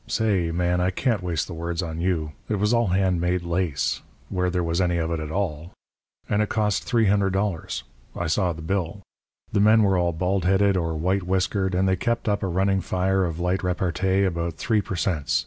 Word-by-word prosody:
say, 100 -7 +1
Man, 90 +1 0
I 90 - +2
can't 105 +2 0
waste 85 -4 -1
the 90 - -8
words 85 +2 -3
on 80 -1 -4
you. 85 -4 0 0.2
It 110 - +1
was 105 +3 +1
all 115 -1 +3
hand 90 -1 +1
made 90 0 0
lace 85 -7 -1 0.3
where 90 0 0
there 90 0 -1
was 85 +2 0
any 90 -1 +1
of 80 0 -1
it 85 - -1
at 80 -1 -5
all 85 -3 -3 0.5
and 105 - +1
it 105 - 0
cost 105 -2 0
$300. 100 - +1 0.3
I - - -2
saw 90 +3 +1
the 80 -1 -7
bill. 95 +2 -2 0.5
The - - +1
men 110 +2 +6
were 95 -2 +3
all 85 0 +1
bald 90 +3 -1
headed 95 +2 +3
or 85 -3 -1
white 90 +5 0
whiskered, 95 +1 0
and 95 +1 +2
they 95 0 +2
kept 115 +6 -1
up 100 -1 +1
a 95 - -1
running 95 +2 +1
fire 95 +1 +1
of 85 -1 -4
light 90 +2 0
repartee 95 +1 0
about 85 -3 -1
3 110 +5 +1
per 95 - -5
cents. 85 -2 0
90 Hz, 210 wpm, -24 LUFS, 85-100 Hz, 0.5 s, men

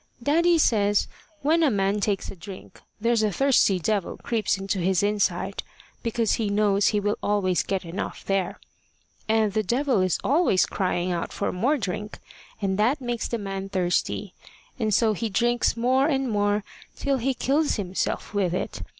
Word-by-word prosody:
Daddy 335 +5 +3
says 205 -8 +2 0.4
when 320 +4 +3
a 315 - +4
man 200 -2 +1
takes 200 -1 -1
a - - -10
drink, 190 +2 -11 0.2
there's 230 +1 +2
a 215 -1 +1
thirsty 260 -5 +3
devil 200 +2 -1
creeps 220 -4 -1
into 195 0 -2
his 185 +1 +1
inside, 200 -2 0 0.4
because 230 -1 0
he 210 - 0
knows 200 -1 +2
he 210 - +2
will 205 +1 -1
always 195 -3 +1
get 190 -2 -3
enough 170 +3 -5
there. 195 -2 -1 0.7
And 220 -2 +2
the 215 - +2
devil 245 +1 +1
is 185 -2 +1
always 285 - +3
crying 180 -2 -1
out 170 -1 -3
for - - -2
more 255 +12 +1
drink, 210 -1 -4 0.5
and 190 0 0
that 245 +8 +2
makes 240 -3 -3
the 235 - -2
man 195 -2 -5
thirsty, 180 -2 -1 0.5
and 220 -2 0
so 220 +1 +3
he 225 +2 -3
drinks 240 +3 +1
more 260 +4 +3
and 270 -5 0
more, 205 0 +1 0.3
till 275 -1 0
he 260 +2 -1
kills 290 +5 +1
himself 190 0 -3
with 185 -4 0
it. - - -4
210 Hz, 170 wpm, -25 LUFS, 195-240 Hz, 0.7 s, a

